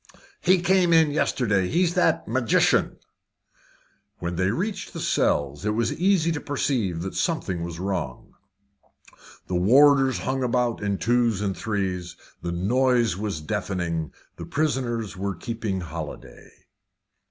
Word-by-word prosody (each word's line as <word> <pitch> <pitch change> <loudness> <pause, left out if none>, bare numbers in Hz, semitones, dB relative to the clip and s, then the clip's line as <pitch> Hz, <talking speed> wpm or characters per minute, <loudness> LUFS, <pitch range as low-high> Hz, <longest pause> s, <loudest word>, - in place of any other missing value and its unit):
"He 185 +1 +4
came 180 -2 +3
in 160 -2 +5
yesterday. 105 -10 +1
It's 175 +1 +2
that 175 -3 +2
magician." 120 0 +2 1.2
When 85 0 -4
they 90 +2 +1
reached 195 - -3
the - - -6
cells, 75 +3 0
it 105 0 0
was 115 0 0
easy 175 -2 +2
to 160 - -3
perceive 115 - -1
that 95 - -5
something 95 - -1
was 85 -1 -6
wrong. 90 -9 -4 1.1
The - - -6
warders 135 +7 +5
hung 135 0 -2
about 120 -2 0
in 100 -1 -1
twos 120 -3 +1
and 100 -2 -1
threes; 95 -5 -3 0.3
the 85 - -3
noise 120 +3 +2
was 100 -5 -4
deafening; 85 -2 -3 0.3
the - - -7
prisoners 125 -8 -1
were 100 0 -3
keeping 110 -2 -4
holiday. 75 -6 -8
110 Hz, 130 wpm, -24 LUFS, 90-135 Hz, 1.2 s, in